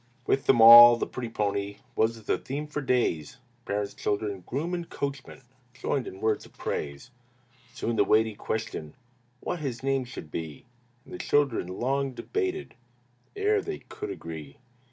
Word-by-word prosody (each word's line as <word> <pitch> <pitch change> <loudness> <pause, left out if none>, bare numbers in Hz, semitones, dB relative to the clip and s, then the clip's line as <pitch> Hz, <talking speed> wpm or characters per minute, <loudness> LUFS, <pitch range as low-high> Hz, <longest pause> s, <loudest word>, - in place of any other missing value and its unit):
With 135 - 0
them 125 - +5
all, 120 +1 +11
the - - -1
pretty 120 -2 -6
pony 100 -2 -2 0.2
Was 110 0 0
the - - 0
theme 145 +3 -5
for 150 0 -4
days; 120 - 0 0.3
Parents, 100 0 -2
children, 100 -2 -2
groom, 160 +7 -3
and 175 -1 -4
coachman 140 -1 -5 0.3
Joined 130 0 -2
in 95 - -9
words 110 -1 +1
of - - -18
praise. 70 - -4 0.6
Soon 120 - -2
arose 115 - -2
the - - +5
weighty 110 +2 +3
question 105 -8 -5 0.5
What 175 - -3
his 130 -5 -4
name 135 -1 0
should 120 - -9
be, 80 -4 -6 0.4
And - - -13
the - - -7
children 140 -10 +1
long 135 +8 -1
debated 380 - -3 0.6
Ere 415 +1 +2
they 395 0 -5
could 415 -2 -8
agree. 80 - -8
120 Hz, 160 wpm, -27 LUFS, 100-140 Hz, 0.6 s, all